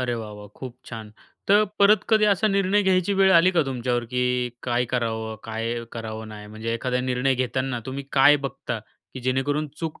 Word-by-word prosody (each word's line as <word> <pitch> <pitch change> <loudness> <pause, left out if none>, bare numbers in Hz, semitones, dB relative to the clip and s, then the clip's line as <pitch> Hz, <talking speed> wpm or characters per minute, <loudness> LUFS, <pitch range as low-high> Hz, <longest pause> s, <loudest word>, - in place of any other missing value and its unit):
अरे 125 -1 -1
वाह 110 -2 -6
वाह! 105 0 -10
खूप 130 -2 -8
छान! 110 -3 -8 0.4
तर 205 +2 +6
परत 200 0 +5
कधी 215 -1 +4
असा 205 0 +3
निर्णय 195 +1 +2
घ्यायची 190 0 +2
वेळ 190 0 +4
आली 175 +1 +6
का 170 -4 +2
तुमच्यावर, 125 -2 -1
की 125 +1 0
काय 120 0 0
करावं? 110 -2 -2
काय 115 +1 -3
करावं 110 -1 -6
नाही 105 -1 -10
म्हणजे 110 +2 -5
एखादा 125 +2 -1
निर्णय 130 +1 0
घेताना 130 0 -2
तुम्ही 135 +1 -5
काय 145 +2 +6
बघता, 130 - -5 0.4
की 130 - -6
जेणेकरून 135 +4 -1
चूक 160 -2 -5
125 Hz, 185 wpm, -24 LUFS, 115-165 Hz, 0.4 s, तर